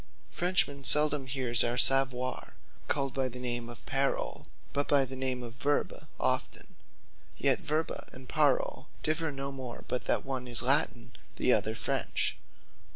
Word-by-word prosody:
A -, -, -20 dB
Frenchman 170 Hz, -6 st, +1 dB
seldome 150 Hz, -1 st, +4 dB
hears 125 Hz, -3 st, +2 dB
our 120 Hz, +1 st, -1 dB
Saviour 130 Hz, -1 st, +4 dB, 0.3 s
called 135 Hz, -3 st, -1 dB
by 135 Hz, -1 st, -1 dB
the 125 Hz, -, -9 dB
name 120 Hz, -1 st, -3 dB
of 120 Hz, -, -11 dB
Parole, 135 Hz, +1 st, -2 dB, 0.3 s
but 145 Hz, 0 st, -1 dB
by 140 Hz, -2 st, +3 dB
the 130 Hz, +1 st, -8 dB
name 130 Hz, -1 st, -2 dB
of 120 Hz, -1 st, -8 dB
Verbe 145 Hz, +3 st, -1 dB, 0.3 s
often; -, -, -2 dB, 0.6 s
yet -, -, +2 dB
Verbe 155 Hz, +1 st, -3 dB
and 130 Hz, 0 st, -12 dB
Parole 145 Hz, -2 st, 0 dB, 0.2 s
differ 155 Hz, +1 st, 0 dB
no 135 Hz, 0 st, -5 dB
more, 130 Hz, -3 st, -8 dB
but 125 Hz, -, -3 dB
that -, -, 0 dB
one 130 Hz, -2 st, -4 dB
is 120 Hz, 0 st, -1 dB
Latin, 135 Hz, -2 st, +3 dB, 0.2 s
the -, -, +2 dB
other -, -, +1 dB
French. -, -, -1 dB
135 Hz, 155 wpm, -30 LUFS, 125-145 Hz, 0.6 s, seldome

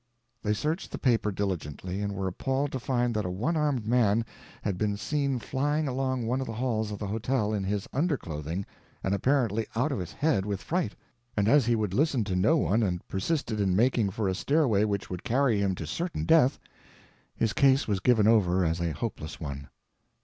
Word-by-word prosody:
They 105 Hz, 0 st, 0 dB
searched 155 Hz, -, -2 dB
the -, -, -4 dB
paper 115 Hz, -4 st, +2 dB
diligently, 95 Hz, -1 st, -3 dB
and 100 Hz, -1 st, -2 dB
were 95 Hz, 0 st, -2 dB
appalled 135 Hz, +9 st, -1 dB
to 130 Hz, -, -3 dB
find 120 Hz, -1 st, 0 dB
that 105 Hz, -1 st, 0 dB
a 90 Hz, -, -3 dB
one 115 Hz, -, -1 dB
armed 145 Hz, -7 st, 0 dB
man 115 Hz, -1 st, +3 dB, 0.4 s
had 100 Hz, -3 st, -1 dB
been 105 Hz, +1 st, -1 dB
seen 140 Hz, +2 st, -1 dB
flying 145 Hz, +5 st, -1 dB
along 130 Hz, -2 st, -1 dB
one 125 Hz, +3 st, 0 dB
of 130 Hz, -, -4 dB
the 115 Hz, -, -4 dB
halls 110 Hz, -3 st, -1 dB
of 105 Hz, -, -4 dB
the 105 Hz, -, -4 dB
hotel 110 Hz, +1 st, -1 dB
in 100 Hz, -2 st, -1 dB
his 100 Hz, 0 st, -2 dB
underclothing 95 Hz, -, -2 dB, 0.4 s
and 95 Hz, -, 0 dB
apparently 115 Hz, 0 st, +1 dB
out 135 Hz, +7 st, +1 dB
of 135 Hz, -, -2 dB
his 90 Hz, -2 st, -5 dB
head 150 Hz, -11 st, +1 dB
with 100 Hz, -1 st, -3 dB
fright, 175 Hz, -, -2 dB, 0.4 s
and 100 Hz, -1 st, +2 dB
as 135 Hz, 0 st, +5 dB
he 120 Hz, -, +3 dB
would 105 Hz, -4 st, -1 dB
listen 135 Hz, -1 st, +2 dB
to 95 Hz, -3 st, -2 dB
no 110 Hz, -, +4 dB
one 115 Hz, -5 st, +2 dB
and 90 Hz, -5 st, -1 dB
persisted 110 Hz, -, -1 dB
in 95 Hz, -2 st, +2 dB
making 115 Hz, -1 st, +3 dB
for 100 Hz, +1 st, -2 dB
a 95 Hz, -, +1 dB
stairway 120 Hz, -, +2 dB
which 100 Hz, -3 st, -2 dB
would 90 Hz, -1 st, -5 dB
carry 125 Hz, -3 st, +2 dB
him 95 Hz, -2 st, +1 dB
to 80 Hz, -, -5 dB
certain 170 Hz, -, -3 dB
death, 155 Hz, -5 st, +5 dB, 0.8 s
his 115 Hz, -1 st, 0 dB
case 135 Hz, 0 st, +4 dB
was 100 Hz, -3 st, 0 dB
given 110 Hz, -1 st, +4 dB
over 95 Hz, -5 st, +4 dB
as 85 Hz, +1 st, 0 dB
a 85 Hz, -2 st, -1 dB
hopeless 80 Hz, -2 st, -5 dB
one. 70 Hz, -3 st, -6 dB
110 Hz, 205 wpm, -28 LUFS, 95-135 Hz, 0.8 s, as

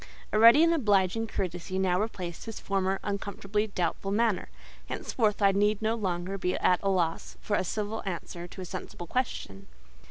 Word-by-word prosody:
A 215 Hz, -, +2 dB
ready 235 Hz, +8 st, +8 dB
and 335 Hz, 0 st, +4 dB
obliging 210 Hz, -, +2 dB
courtesy 185 Hz, -2 st, -3 dB
now 185 Hz, 0 st, +2 dB
replaced 185 Hz, -6 st, -5 dB
his 225 Hz, -, -6 dB
former 195 Hz, -1 st, 0 dB
uncomfortably 205 Hz, +1 st, -2 dB
doubtful 195 Hz, 0 st, -2 dB
manner; 220 Hz, -1 st, +1 dB, 0.4 s
henceforth 215 Hz, -3 st, 0 dB
I 200 Hz, -, +6 dB
need 205 Hz, +1 st, +2 dB
no 220 Hz, +1 st, +1 dB
longer 190 Hz, -3 st, -2 dB
be 180 Hz, 0 st, 0 dB
at 180 Hz, -, +3 dB
a 195 Hz, -, +1 dB
loss 175 Hz, -4 st, -1 dB
for 205 Hz, -, -1 dB
a -, -, +1 dB
civil 210 Hz, +3 st, -3 dB
answer 175 Hz, -2 st, -5 dB
to 190 Hz, -, -10 dB
a -, -, -5 dB
sensible 175 Hz, -1 st, -7 dB
question. 160 Hz, -, -3 dB
195 Hz, 170 wpm, -29 LUFS, 180-215 Hz, 0.4 s, ready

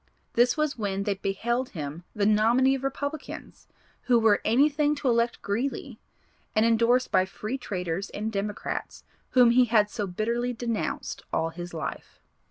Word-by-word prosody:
This 240 Hz, +4 st, +3 dB
was 305 Hz, -4 st, -1 dB
when 200 Hz, -2 st, -1 dB
they 205 Hz, -, 0 dB
beheld 235 Hz, +6 st, -2 dB
him 150 Hz, +3 st, -6 dB
the 205 Hz, -2 st, +1 dB
nominee 230 Hz, +5 st, +4 dB
of 270 Hz, -1 st, -3 dB
Republicans, 285 Hz, +2 st, -5 dB, 0.4 s
'who 245 Hz, -2 st, +4 dB
were 220 Hz, -3 st, +4 dB
anything 290 Hz, +5 st, +3 dB
to 285 Hz, -, -3 dB
elect 235 Hz, -1 st, +1 dB
Greeley,' 235 Hz, +7 st, -3 dB, 0.6 s
and 215 Hz, +1 st, +4 dB
endorsed 235 Hz, +2 st, +3 dB
by 185 Hz, -1 st, +4 dB
Free 215 Hz, +7 st, -5 dB
Traders 185 Hz, -3 st, -3 dB
and 215 Hz, +2 st, -4 dB
Democrats 205 Hz, 0 st, -4 dB, 0.3 s
whom 245 Hz, -2 st, +6 dB
he 250 Hz, +1 st, +5 dB
had 215 Hz, -3 st, +3 dB
so 205 Hz, -4 st, -3 dB
bitterly 235 Hz, +6 st, -1 dB
denounced 230 Hz, -2 st, -3 dB
all 165 Hz, -, 0 dB
his 175 Hz, +1 st, -8 dB
life. 160 Hz, -2 st, -6 dB
230 Hz, 155 wpm, -27 LUFS, 200-250 Hz, 0.6 s, whom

